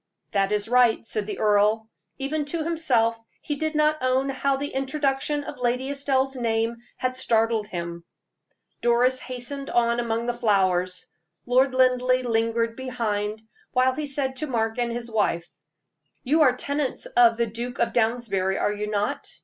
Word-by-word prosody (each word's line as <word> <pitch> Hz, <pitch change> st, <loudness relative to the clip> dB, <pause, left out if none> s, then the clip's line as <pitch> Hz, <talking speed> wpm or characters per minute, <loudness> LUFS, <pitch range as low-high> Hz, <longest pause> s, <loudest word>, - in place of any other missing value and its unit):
"That 195 Hz, -1 st, +1 dB
is 210 Hz, 0 st, +1 dB
right," 245 Hz, -2 st, +3 dB
said 215 Hz, -2 st, -3 dB
the -, -, -4 dB
earl. 215 Hz, +1 st, +2 dB, 0.3 s
Even 295 Hz, +3 st, -2 dB
to 320 Hz, +2 st, -2 dB
himself 240 Hz, -9 st, +1 dB, 0.2 s
he 295 Hz, -, -3 dB
did 315 Hz, +2 st, -2 dB
not 305 Hz, 0 st, +3 dB
own 260 Hz, +1 st, +1 dB
how 275 Hz, 0 st, 0 dB
the 285 Hz, +1 st, -3 dB
introduction 275 Hz, +1 st, -1 dB
of -, -, -8 dB
Lady 250 Hz, +2 st, 0 dB
Estelle's 270 Hz, -1 st, 0 dB
name 230 Hz, -1 st, 0 dB, 0.2 s
had 255 Hz, 0 st, -1 dB
startled 225 Hz, -3 st, +1 dB
him. 170 Hz, -2 st, -5 dB, 0.8 s
Doris 245 Hz, +2 st, +3 dB
hastened 255 Hz, +3 st, -5 dB
on 235 Hz, 0 st, +2 dB
among 230 Hz, 0 st, -1 dB
the 240 Hz, -, 0 dB
flowers. 185 Hz, -6 st, +1 dB, 0.4 s
Lord 255 Hz, +2 st, +3 dB
Linleigh 255 Hz, 0 st, +3 dB
lingered 230 Hz, 0 st, 0 dB
behind, 220 Hz, -4 st, -3 dB, 0.3 s
while 255 Hz, 0 st, +3 dB
he 300 Hz, +2 st, -4 dB
said 270 Hz, -2 st, -2 dB
to 305 Hz, -, -2 dB
Mark 225 Hz, -2 st, -1 dB
and 240 Hz, -1 st, 0 dB
his 235 Hz, 0 st, -5 dB
wife: 185 Hz, -6 st, 0 dB, 0.8 s
"You 305 Hz, +5 st, +2 dB
are 260 Hz, -5 st, +6 dB
tenants 285 Hz, +1 st, -2 dB
of 235 Hz, -1 st, +4 dB
the 235 Hz, -, +2 dB
Duke 235 Hz, +3 st, -5 dB
of 235 Hz, -, 0 dB
Downsbury, 220 Hz, -5 st, 0 dB
are 205 Hz, -, 0 dB
you 210 Hz, 0 st, -4 dB
not?" 205 Hz, -1 st, -2 dB
240 Hz, 160 wpm, -25 LUFS, 225-265 Hz, 0.8 s, are